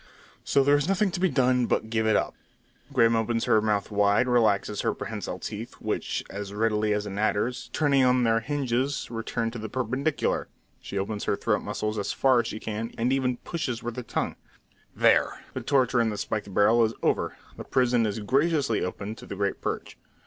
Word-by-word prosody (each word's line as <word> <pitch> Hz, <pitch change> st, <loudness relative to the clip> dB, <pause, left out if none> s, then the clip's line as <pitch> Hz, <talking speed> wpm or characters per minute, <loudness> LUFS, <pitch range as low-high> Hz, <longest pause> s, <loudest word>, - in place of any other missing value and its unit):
So 140 Hz, -, +3 dB
there 145 Hz, +1 st, +5 dB
is 145 Hz, +1 st, +1 dB
nothing 195 Hz, +1 st, +2 dB
to 175 Hz, -, -3 dB
be 190 Hz, 0 st, +3 dB
done, 125 Hz, -3 st, +2 dB
but 110 Hz, -, -1 dB
give 110 Hz, -1 st, +1 dB
it 110 Hz, -, +4 dB
up! -, -, 0 dB, 0.6 s
Grim 115 Hz, 0 st, +4 dB
opens 115 Hz, +1 st, 0 dB
her 110 Hz, -, +4 dB
mouth 105 Hz, -1 st, 0 dB
wide, 105 Hz, +4 st, +3 dB
relaxes 110 Hz, -4 st, +2 dB
her -, -, 0 dB
prehensile -, -, -5 dB
teeth, -, -, -6 dB
which, -, -, -3 dB
as 100 Hz, 0 st, -6 dB
readily 105 Hz, 0 st, +1 dB
as 105 Hz, 0 st, 0 dB
an 100 Hz, 0 st, -5 dB
adder's, 110 Hz, +3 st, 0 dB
turning 140 Hz, -3 st, +3 dB
on 125 Hz, 0 st, +4 dB
their 115 Hz, -1 st, +3 dB
hinges, 135 Hz, +1 st, -1 dB
return 115 Hz, 0 st, -2 dB
to 120 Hz, -, -7 dB
the 110 Hz, 0 st, -5 dB
perpendicular; 130 Hz, +5 st, -1 dB, 0.3 s
she 100 Hz, -, -6 dB
opens 100 Hz, +2 st, -3 dB
her -, -, +1 dB
throat -, -, 0 dB
muscles 105 Hz, 0 st, -3 dB
as 100 Hz, -, -2 dB
far 130 Hz, -2 st, +4 dB
as 120 Hz, -, 0 dB
she 110 Hz, -, -5 dB
can, 110 Hz, +2 st, -4 dB
and 120 Hz, +3 st, +1 dB
even 125 Hz, -2 st, 0 dB
pushes 125 Hz, -9 st, -3 dB
with 120 Hz, -1 st, -4 dB
her 125 Hz, -, -4 dB
tongue. -, -, -3 dB, 0.6 s
"There! -, -, +3 dB
The -, -, -4 dB
torture 130 Hz, -3 st, +2 dB
in 115 Hz, -, +2 dB
the 105 Hz, -, -4 dB
spiked 100 Hz, 0 st, -3 dB
barrel 110 Hz, +4 st, +4 dB
is 110 Hz, 0 st, 0 dB
over. -, -, 0 dB, 0.2 s
The -, -, -6 dB
prison 120 Hz, -3 st, +2 dB
is 105 Hz, -, -3 dB
graciously 140 Hz, +1 st, +1 dB
open 100 Hz, +3 st, -4 dB
to -, -, -11 dB
the -, -, -5 dB
great 100 Hz, 0 st, -2 dB
perch." -, -, -4 dB
115 Hz, 200 wpm, -26 LUFS, 105-130 Hz, 0.6 s, there